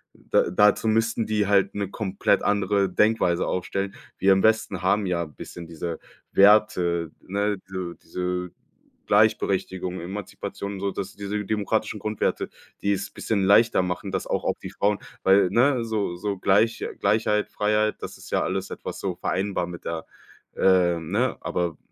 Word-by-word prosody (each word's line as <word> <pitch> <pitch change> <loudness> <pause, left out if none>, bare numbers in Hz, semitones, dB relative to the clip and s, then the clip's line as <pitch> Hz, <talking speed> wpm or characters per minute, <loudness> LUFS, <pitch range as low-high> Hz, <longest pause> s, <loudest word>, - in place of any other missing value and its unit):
da - - +1
dazu 105 +4 +4
müssten 115 +1 +1
die 105 -2 +1
halt 100 -1 +3
'ne 100 -2 -2
komplett 100 -1 0
andere 100 -1 +2
Denkweise 95 -3 +2
aufstellen. 95 +2 -2 0.2
Wir 95 +1 +5
im 95 - +1
Westen 110 -1 +2
haben 100 +2 +2
ja 85 -1 0
bisschen 80 +2 -10
diese 85 0 -5 0.3
Werte, 90 -5 +4
ne? 100 +1 -1
Diese 95 -2 -5
diese 90 0 -4 0.6
Gleichberechtigung, 95 -3 +1
Emanzipation, 100 +1 -6
sodass 100 0 -4
diese 105 +1 -3
demokratischen 105 0 -1
Grundwerte, 105 +1 -1 0.3
die 100 0 +2
es 100 0 -4
bisschen 100 -3 -1
leichter 105 +3 +5
machen, 90 +2 -3
dass - - -2
auch - - -1
auf - - 0
die - - -5
Frauen 100 0 0 0.2
weil 95 -1 +5
ne, 125 0 +3
so 105 -5 -1
so 100 +2 -3
Gleich 105 +5 +2
Gleichheit, 105 -1 +1
Freiheit, 105 +1 +1
das - - -7
ist - - -13
ja - - +2
alles 95 0 -2
etwas - - -6
so 95 -3 -3
vereinbar 95 0 -1
mit 85 -1 -9
der 80 -1 -4 0.5
ähm, 85 -3 +3
ne? 120 +4 +1
Aber 85 -2 -2
100 Hz, 155 wpm, -25 LUFS, 90-105 Hz, 0.6 s, Wir